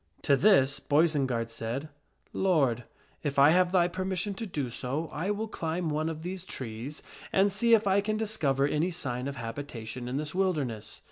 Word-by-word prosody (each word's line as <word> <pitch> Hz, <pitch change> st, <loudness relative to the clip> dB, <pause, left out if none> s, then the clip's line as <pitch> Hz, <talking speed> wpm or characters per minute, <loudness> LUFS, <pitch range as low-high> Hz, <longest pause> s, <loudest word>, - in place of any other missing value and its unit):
To 140 Hz, -, +5 dB
this 140 Hz, -6 st, +4 dB
Boisenard 140 Hz, -7 st, +1 dB
said, 115 Hz, +6 st, -4 dB, 0.2 s
" -, -, -40 dB, 0.2 s
Lord, 130 Hz, -9 st, +2 dB, 0.4 s
if 145 Hz, -2 st, -3 dB
I 140 Hz, +2 st, +7 dB
have 180 Hz, +1 st, +4 dB
thy 175 Hz, -2 st, +4 dB
permission 185 Hz, +2 st, -2 dB
to 225 Hz, +3 st, -5 dB
do 145 Hz, -9 st, -3 dB
so, 140 Hz, +7 st, -3 dB
I 165 Hz, +6 st, -2 dB
will 210 Hz, +2 st, -1 dB
climb 165 Hz, -4 st, -2 dB
one 155 Hz, +2 st, 0 dB
of 160 Hz, 0 st, -6 dB
these 180 Hz, +1 st, -4 dB
trees 130 Hz, -2 st, -6 dB, 0.3 s
and 195 Hz, +1 st, +4 dB
see 230 Hz, +4 st, +5 dB
if 220 Hz, -1 st, 0 dB
I 195 Hz, 0 st, +3 dB
can 215 Hz, +1 st, -1 dB
discover 155 Hz, -12 st, +1 dB
any 150 Hz, +4 st, +1 dB
sign 130 Hz, -6 st, -3 dB
of 140 Hz, -, -4 dB
habita 115 Hz, 0 st, -6 dB
tion 120 Hz, +2 st, -6 dB
in 125 Hz, +2 st, -2 dB
this 150 Hz, 0 st, -3 dB
wilderness." 150 Hz, -, -1 dB
155 Hz, 190 wpm, -29 LUFS, 130-185 Hz, 0.4 s, I